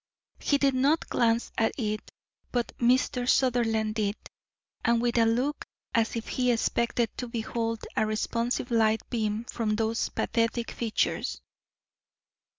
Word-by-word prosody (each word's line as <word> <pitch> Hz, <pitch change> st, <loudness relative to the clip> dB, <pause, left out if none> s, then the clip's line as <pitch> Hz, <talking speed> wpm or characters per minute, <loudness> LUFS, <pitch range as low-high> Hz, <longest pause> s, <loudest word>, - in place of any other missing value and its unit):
He 285 Hz, -, +2 dB
did 275 Hz, -1 st, +3 dB
not 280 Hz, +5 st, +2 dB
glance 230 Hz, 0 st, +1 dB
at 225 Hz, -, +2 dB
it, 215 Hz, -4 st, -3 dB, 0.4 s
but 240 Hz, -1 st, -1 dB
Mr. 250 Hz, 0 st, +2 dB
Sutherland 225 Hz, -4 st, +2 dB
did, 210 Hz, -2 st, 0 dB, 0.7 s
and 235 Hz, 0 st, +3 dB
with 240 Hz, 0 st, 0 dB
a 230 Hz, -, +5 dB
look 250 Hz, +6 st, 0 dB, 0.3 s
as 230 Hz, 0 st, +1 dB
if 230 Hz, -, -4 dB
he 250 Hz, -1 st, +1 dB
expected 235 Hz, 0 st, 0 dB
to 250 Hz, -, -4 dB
behold 230 Hz, -1 st, -3 dB
a 220 Hz, -, +2 dB
responsive 235 Hz, +3 st, -1 dB
light 220 Hz, -1 st, +2 dB
beam 220 Hz, -2 st, -1 dB
from 220 Hz, -3 st, -1 dB
those 225 Hz, +1 st, 0 dB
pathetic 230 Hz, 0 st, -1 dB
features. 225 Hz, -2 st, -1 dB
230 Hz, 135 wpm, -28 LUFS, 225-245 Hz, 0.7 s, a